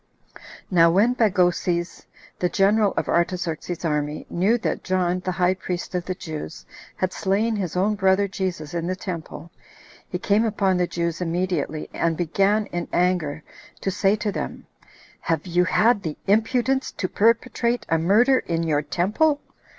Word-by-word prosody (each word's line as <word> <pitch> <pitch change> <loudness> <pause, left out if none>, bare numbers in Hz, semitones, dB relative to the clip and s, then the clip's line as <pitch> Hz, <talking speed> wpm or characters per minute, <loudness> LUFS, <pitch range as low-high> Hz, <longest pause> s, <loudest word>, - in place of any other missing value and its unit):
Now 170 -2 +6
when 205 +8 +3
Bagoses, 180 -5 0 0.3
the 180 - +1
general 200 +2 +3
of - - 0
Artaxerxes's 170 -1 -1
army, 150 -1 -2
knew 200 +7 +2
that 235 - -3
John, 185 -1 0
the 185 0 -3
high 180 +1 +2
priest 180 -1 -5
of 180 -1 -2
the 185 - -3
Jews, 160 -2 -7 0.3
had 185 0 -2
slain 210 +4 0
his 180 -3 -3
own 200 +4 +2
brother 195 0 +2
Jesus 185 -5 -4
in 170 0 -2
the 185 - -1
temple, 170 -3 -7 0.6
he 180 - -2
came 205 +4 +2
upon 200 -4 +1
the 180 0 +1
Jews 170 0 -3
immediately, 170 -3 -2
and 165 -1 0
began 195 +5 +1
in 175 -1 -3
anger 175 -4 0 0.4
to 195 - -1
say 195 +1 +2
to 210 -1 -2
them, - - -5 0.5
"Have 165 0 -1
you 180 0 +2
had 215 +4 +3
the 155 -4 -5
impudence 245 +6 +1
to 185 - -2
perpetrate 235 +2 +1
a 165 - +1
murder 230 +10 +4
in 165 -1 -2
your 150 -3 +1
temple?" 210 - +1
185 Hz, 160 wpm, -23 LUFS, 170-205 Hz, 0.6 s, Now